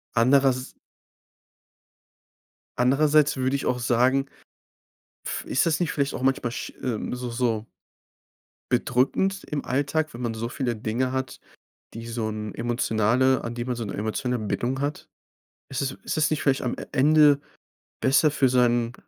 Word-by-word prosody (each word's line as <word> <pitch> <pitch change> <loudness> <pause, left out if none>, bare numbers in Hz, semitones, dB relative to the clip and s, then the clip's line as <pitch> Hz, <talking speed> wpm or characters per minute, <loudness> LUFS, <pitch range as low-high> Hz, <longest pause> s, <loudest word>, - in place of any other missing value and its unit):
Anderers 130 +2 +3 2.0
andererseits 145 +4 +3
würde 130 +1 0
ich 140 - -3
auch 125 - 0
sagen, 125 +3 +2 1.0
pf - - -4
ist 135 - +1
das 165 -1 +1
nicht 175 -4 0
vielleicht 140 -1 -1
auch - - -5
manchmal 130 -2 +1
sch 120 - -5
äh, 120 -4 -3
so 125 0 -5
so 115 -2 -1 1.1
bedrückend 130 +11 +1
im 145 -1 -4
Alltag, 145 +4 -1
wenn 120 - -8
man 115 -2 -2
so 115 +1 -3
viele 120 -1 -2
Dinge 115 +4 -1
hat, 130 -1 -3 0.5
die 115 +1 -7
so 115 -1 -3
'n 105 -1 -5
emotionale 120 +2 +1
an 115 - -4
die 120 0 -4
man 125 0 -3
so 115 -1 -4
'ne 100 - -5
emotionale 115 +3 -2
Bindung 125 +5 -2
hat? 145 +1 -3 0.6
Ist 135 - -3
es 135 -1 -1
ist - - -3
es 155 -1 +3
nicht 155 - 0
vielleicht 135 -1 +2
am 125 - -1
E - - -6
Ende 145 +1 +5 0.6
besser 140 +3 +4
für 135 -2 +2
sein 120 -1 +2
125 Hz, 155 wpm, -25 LUFS, 120-140 Hz, 2.0 s, Ende